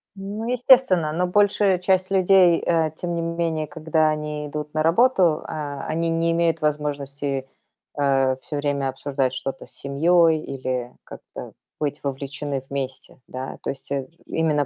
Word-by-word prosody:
Ну 205 Hz, +3 st, -5 dB
естественно, 245 Hz, -, +4 dB
но 175 Hz, +4 st, 0 dB
большая 200 Hz, 0 st, +3 dB
часть 185 Hz, +1 st, +1 dB
людей, 185 Hz, -2 st, +5 dB
э, 165 Hz, -2 st, +2 dB
тем 175 Hz, 0 st, -3 dB
не 170 Hz, -, -1 dB
менее, 165 Hz, -2 st, -1 dB
когда 155 Hz, 0 st, +1 dB
они 150 Hz, -1 st, -3 dB
идут 150 Hz, 0 st, -5 dB
на 155 Hz, -, +2 dB
работу, 175 Hz, -2 st, +3 dB
а, 145 Hz, -2 st, -5 dB
они 165 Hz, +1 st, -1 dB
не 165 Hz, 0 st, +1 dB
имеют 165 Hz, -1 st, +1 dB
возможности, 145 Hz, -2 st, -2 dB, 0.5 s
э, 135 Hz, -2 st, +2 dB
всё 150 Hz, -, -5 dB
время 145 Hz, -1 st, -1 dB
обсуждать 135 Hz, 0 st, -1 dB
что-то 135 Hz, +1 st, -5 dB
с -, -, -17 dB
семьей 160 Hz, +3 st, +3 dB
или 130 Hz, -2 st, -4 dB
как-то -, -, -10 dB, 0.3 s
быть 145 Hz, -1 st, -3 dB
вовлечены 140 Hz, 0 st, -4 dB
вместе, 135 Hz, -2 st, -5 dB
да. 130 Hz, +1 st, -6 dB
То -, -, -1 dB
есть, 135 Hz, 0 st, -11 dB
э, 135 Hz, -2 st, -2 dB, 0.2 s
именно 155 Hz, -3 st, +1 dB
155 Hz, 150 wpm, -23 LUFS, 140-170 Hz, 0.5 s, людей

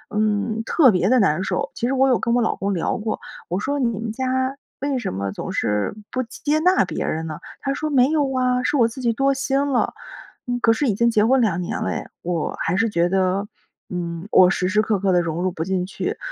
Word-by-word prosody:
嗯， 215 Hz, +1 st, 0 dB
特 265 Hz, +1 st, +5 dB
别 185 Hz, 0 st, +1 dB
的 255 Hz, -, +5 dB
难 185 Hz, -4 st, +2 dB
受。 185 Hz, -1 st, -2 dB
其 235 Hz, -, -2 dB
实 260 Hz, -, 0 dB
我 270 Hz, 0 st, +3 dB
有 255 Hz, -3 st, +3 dB
跟 235 Hz, +1 st, +1 dB
我 245 Hz, -, +3 dB
老 -, -, 0 dB
公 200 Hz, 0 st, -2 dB
聊 170 Hz, -, -1 dB
过， 215 Hz, 0 st, -3 dB, 0.3 s
我 180 Hz, +3 st, -1 dB
说： 285 Hz, +7 st, -2 dB
“你 245 Hz, -, +3 dB
们 225 Hz, -1 st, -3 dB
家 260 Hz, +2 st, -1 dB, 0.2 s
为 275 Hz, -1 st, -1 dB
什 225 Hz, -, -3 dB
么 100 Hz, 0 st, -2 dB
总 -, -, -6 dB
是 105 Hz, -, -1 dB, 0.2 s
不 255 Hz, -, -1 dB
接 235 Hz, -, -9 dB
接 300 Hz, +1 st, +3 dB
纳 365 Hz, +4 st, +4 dB
别 -, -, -4 dB
人 160 Hz, +1 st, -2 dB
呢？” 155 Hz, -2 st, -6 dB, 0.2 s
他 275 Hz, -, -1 dB
说： 305 Hz, +2 st, -3 dB
“没 265 Hz, -2 st, +4 dB
有 310 Hz, -2 st, +2 dB
哇。” 255 Hz, -2 st, +1 dB
是 290 Hz, -, +1 dB
我 235 Hz, -3 st, +5 dB
自 240 Hz, +3 st, -8 dB
己 235 Hz, -2 st, +1 dB
多 275 Hz, +4 st, +2 dB
心 270 Hz, 0 st, -1 dB
了。 250 Hz, -, +1 dB, 0.7 s
可 225 Hz, -, +5 dB
是 255 Hz, +6 st, -1 dB
已 220 Hz, -, +2 dB
经 235 Hz, +4 st, +2 dB
结 215 Hz, -2 st, +3 dB
婚 260 Hz, +2 st, +4 dB
2 195 Hz, -7 st, +1 dB
年 175 Hz, -, -3 dB
了 -, -, -1 dB
诶， -, -, -3 dB, 0.2 s
我 170 Hz, -2 st, -2 dB
还 170 Hz, +3 st, 0 dB
是 225 Hz, +3 st, +3 dB
觉 175 Hz, -3 st, +1 dB
得， 190 Hz, +1 st, +1 dB, 0.4 s
嗯， 170 Hz, 0 st, -4 dB
我 180 Hz, -1 st, +7 dB
时 180 Hz, -1 st, 0 dB
时 210 Hz, +3 st, +3 dB
刻 215 Hz, -2 st, 0 dB
刻 195 Hz, 0 st, +1 dB
地 180 Hz, -, +4 dB
融 165 Hz, 0 st, -3 dB
入 185 Hz, -, +1 dB
不 160 Hz, -2 st, -4 dB
进 185 Hz, 0 st, -1 dB
去， 190 Hz, -, -4 dB
220 Hz, 260 characters per minute, -22 LUFS, 185-260 Hz, 0.7 s, 我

